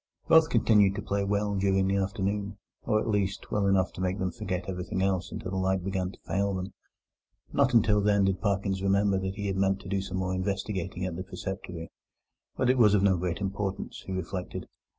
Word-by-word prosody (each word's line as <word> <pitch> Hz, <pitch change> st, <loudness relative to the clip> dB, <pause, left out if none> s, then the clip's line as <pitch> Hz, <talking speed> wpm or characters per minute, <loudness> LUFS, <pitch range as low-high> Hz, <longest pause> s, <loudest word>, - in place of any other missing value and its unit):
Both 160 Hz, 0 st, +6 dB
continued 105 Hz, -5 st, +4 dB
to 105 Hz, -, -4 dB
play 100 Hz, 0 st, -1 dB
well 100 Hz, +1 st, 0 dB
during 95 Hz, -1 st, +2 dB
the 100 Hz, +1 st, +1 dB
afternoon, 100 Hz, +1 st, -2 dB, 0.3 s
or, 110 Hz, -2 st, +2 dB
at 110 Hz, -, -3 dB
least, 100 Hz, -2 st, -1 dB
well 105 Hz, -1 st, +1 dB
enough 95 Hz, -1 st, +2 dB
to -, -, -7 dB
make 95 Hz, +1 st, 0 dB
them 95 Hz, -2 st, -1 dB
forget 90 Hz, +4 st, -4 dB
everything 95 Hz, 0 st, -2 dB
else 95 Hz, -2 st, 0 dB
until 90 Hz, -, -5 dB
the 95 Hz, -, -2 dB
light 95 Hz, -1 st, +1 dB
began 95 Hz, -1 st, -2 dB
to -, -, -17 dB
fail 100 Hz, 0 st, 0 dB
them. 95 Hz, +1 st, -5 dB, 0.8 s
Not 125 Hz, -, +3 dB
until 105 Hz, -2 st, +4 dB
then 100 Hz, -1 st, +3 dB
did 95 Hz, -1 st, 0 dB
Parkins 100 Hz, -2 st, 0 dB
remember 100 Hz, 0 st, +2 dB
that 95 Hz, 0 st, -3 dB
he 100 Hz, -, -4 dB
had 95 Hz, -1 st, -1 dB
meant 95 Hz, 0 st, +2 dB
to -, -, -11 dB
do 100 Hz, 0 st, 0 dB
some 95 Hz, -1 st, -4 dB
more 95 Hz, 0 st, -1 dB
investigating 95 Hz, -1 st, -2 dB
at 90 Hz, -2 st, -3 dB
the 90 Hz, -, -4 dB
preceptory; 95 Hz, -4 st, -6 dB, 0.7 s
but -, -, +1 dB
it 130 Hz, 0 st, +3 dB
was 105 Hz, -3 st, +6 dB
of 100 Hz, -, +3 dB
no 100 Hz, -2 st, +4 dB
great 90 Hz, +1 st, -2 dB
importance, 95 Hz, 0 st, -3 dB
he -, -, -5 dB
reflected. 95 Hz, 0 st, -4 dB
95 Hz, 210 wpm, -28 LUFS, 95-100 Hz, 0.8 s, Both